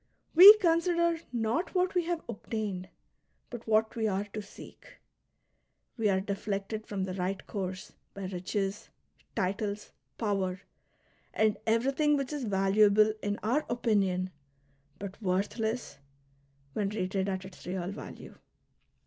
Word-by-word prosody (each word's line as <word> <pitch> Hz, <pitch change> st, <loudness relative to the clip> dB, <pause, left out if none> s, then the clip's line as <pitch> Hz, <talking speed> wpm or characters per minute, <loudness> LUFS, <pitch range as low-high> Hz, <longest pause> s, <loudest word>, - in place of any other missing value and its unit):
We 395 Hz, +6 st, +12 dB
consider 340 Hz, -2 st, +2 dB
not 240 Hz, -, -1 dB
what 360 Hz, 0 st, +2 dB
we 355 Hz, -2 st, +1 dB
have 340 Hz, -1 st, -2 dB
obtained, 205 Hz, -4 st, -4 dB, 0.6 s
but 240 Hz, -2 st, -8 dB
what 220 Hz, 0 st, +2 dB
we 220 Hz, -1 st, 0 dB
are 195 Hz, -1 st, 0 dB
to 215 Hz, -, -3 dB
seek. 205 Hz, -, -14 dB, 1.0 s
We 225 Hz, -4 st, +1 dB
are 190 Hz, -1 st, +2 dB
deflected 200 Hz, +2 st, -4 dB
from 195 Hz, -2 st, -2 dB
the 185 Hz, -1 st, -3 dB
right 185 Hz, +1 st, -3 dB
course 185 Hz, -3 st, -5 dB, 0.2 s
by 195 Hz, -1 st, -5 dB
riches, 195 Hz, +2 st, -3 dB, 0.5 s
titles, 200 Hz, +2 st, -2 dB, 0.3 s
power, 195 Hz, -4 st, -1 dB, 0.7 s
and 215 Hz, -1 st, +3 dB
everything 275 Hz, +6 st, +2 dB
which 275 Hz, +1 st, -3 dB
is 285 Hz, -4 st, -3 dB
valuable 205 Hz, +1 st, +4 dB
in 205 Hz, 0 st, -1 dB
our 255 Hz, +8 st, +1 dB
opinion 195 Hz, -6 st, +1 dB, 0.7 s
but 200 Hz, +2 st, -8 dB
worthless 220 Hz, +5 st, -2 dB, 0.7 s
when 205 Hz, -2 st, 0 dB
rated 195 Hz, -1 st, -1 dB
at 190 Hz, -1 st, -3 dB
its 185 Hz, -2 st, -12 dB
real 180 Hz, 0 st, -3 dB
value. -, -, -9 dB
210 Hz, 125 wpm, -30 LUFS, 195-235 Hz, 1.0 s, We